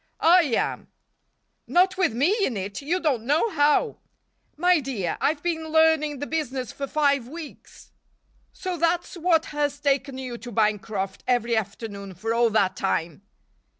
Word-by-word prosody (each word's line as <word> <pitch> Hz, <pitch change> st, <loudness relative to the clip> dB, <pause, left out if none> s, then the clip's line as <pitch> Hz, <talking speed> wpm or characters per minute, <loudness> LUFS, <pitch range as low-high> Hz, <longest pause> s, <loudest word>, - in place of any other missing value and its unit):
"I 345 Hz, +1 st, +6 dB
am." 250 Hz, -6 st, -1 dB, 0.8 s
"Not 370 Hz, +1 st, +3 dB
with 375 Hz, -6 st, +2 dB
me 285 Hz, -, +2 dB
in 245 Hz, -, 0 dB
it. 200 Hz, +4 st, -5 dB
You 330 Hz, +6 st, -1 dB
don't 280 Hz, -10 st, 0 dB
know 300 Hz, -, +1 dB
how." 300 Hz, +8 st, +2 dB, 0.6 s
"My 355 Hz, +1 st, +4 dB
dear, 245 Hz, -, -3 dB
I've 295 Hz, 0 st, 0 dB
been 325 Hz, -2 st, -2 dB
learning 320 Hz, -2 st, +3 dB
the 290 Hz, -, -4 dB
business 270 Hz, -6 st, -3 dB
for 275 Hz, -, -5 dB
five 280 Hz, -4 st, +1 dB
weeks." 315 Hz, +2 st, -11 dB, 0.6 s
"So 370 Hz, -2 st, -5 dB
that's 340 Hz, +3 st, 0 dB
what 335 Hz, -2 st, +2 dB
has 290 Hz, -1 st, -1 dB
taken 275 Hz, -2 st, 0 dB
you 250 Hz, -3 st, -6 dB
to 240 Hz, +2 st, -9 dB
Bancroft 210 Hz, -2 st, -1 dB
every 240 Hz, -2 st, +1 dB
afternoon 200 Hz, -2 st, -5 dB
for 225 Hz, +6 st, -2 dB
all 235 Hz, 0 st, +3 dB
that 200 Hz, -4 st, +1 dB
time?" 170 Hz, -4 st, -2 dB
280 Hz, 150 wpm, -25 LUFS, 225-320 Hz, 0.8 s, I